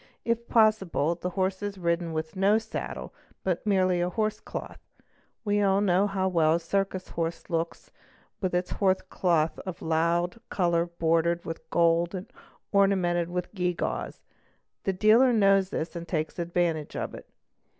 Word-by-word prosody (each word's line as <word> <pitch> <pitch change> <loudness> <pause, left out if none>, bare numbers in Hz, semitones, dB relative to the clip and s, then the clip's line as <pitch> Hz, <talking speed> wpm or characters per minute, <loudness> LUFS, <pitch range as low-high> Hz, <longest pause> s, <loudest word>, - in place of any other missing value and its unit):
If 235 0 -1
possible 215 -8 +3
the 180 +1 -4
horse 190 +1 -1
is 205 -1 -4
ridden 170 -1 -1
with 160 0 -4
no 195 +3 +4
saddle, 220 0 -5 0.3
but 185 +2 -1
merely 185 -3 +3
a 175 - +1
horse 215 +2 -1
cloth - - -7 0.7
We 205 0 +2
all 195 -1 +3
know 195 0 +3
how 190 -1 0
well 165 -3 +3
a - - 0
circus 190 +2 -2
horse 165 +1 -4
looks 165 0 -3 0.5
with 185 -2 0
its 180 0 -1
horse 190 -2 +1
cloth 165 -3 +1
of 185 -2 -6
a - - -9
loue 170 +2 +1 0.2
colour 170 -2 +1
bordered 170 0 +1
with 165 - -7
gold 170 +1 +2
and 185 +1 -7 0.4
ornamented 185 -4 +2
with 180 +2 -4
gewgaws; 180 -3 -2 0.6
the 195 - +1
deale 215 +7 +5
knows 195 -4 +4
this 165 -2 -4
and 170 0 -6
takes 155 0 -2
advantage 170 -3 -1
of - - -3
it. - - -11
180 Hz, 160 wpm, -27 LUFS, 170-195 Hz, 0.7 s, deale